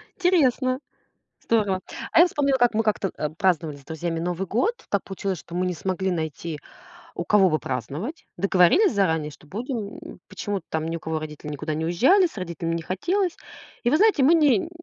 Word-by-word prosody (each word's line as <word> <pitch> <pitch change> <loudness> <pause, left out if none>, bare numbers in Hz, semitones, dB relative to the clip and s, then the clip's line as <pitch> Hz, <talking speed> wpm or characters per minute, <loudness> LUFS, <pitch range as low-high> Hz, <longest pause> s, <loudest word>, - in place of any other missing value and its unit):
Интересно. 270 -8 +2 0.6
Здорово, 205 -5 +1 0.3
а - - +6
я 345 - +8
вспомнила, 280 -5 +1
как 245 -2 +3
мы 225 - +1
как-то, 205 -3 0
э, 150 - -1
праздновали 165 -2 0
с 140 - -15
друзьями 165 +2 -3
Новый 180 +3 -2
год. 450 - -1
Так 200 - 0
получилось, 195 -2 -4
что 170 - -10
мы 180 +1 0
не 180 - -1
смогли 190 +3 -2
найти, 160 -2 -3 0.6
у - - -2
кого 195 -3 +4
бы 155 - +1
праздновать. 145 - -5
Договорились 195 - +4
заранее, 160 -7 +1
что 150 - -17
будем, 220 - -5
м, - - -11
почему-то 200 -2 -4
там 160 0 -2
ни 165 - -2
у - - -10
кого 160 0 -3
родители 150 -1 -7
никуда 150 +1 -4
не 160 +1 -2
уезжали, 270 - +4
с 315 - -16
родителями 170 -2 -3
не 165 - -3
хотелось. 355 - -1 0.5
И 240 - +3
вы 280 - +3
знаете, 420 -6 +4
мы 305 - +6
не, 300 -3 +5
м, 330 - -7
190 Hz, 200 wpm, -24 LUFS, 165-255 Hz, 0.6 s, я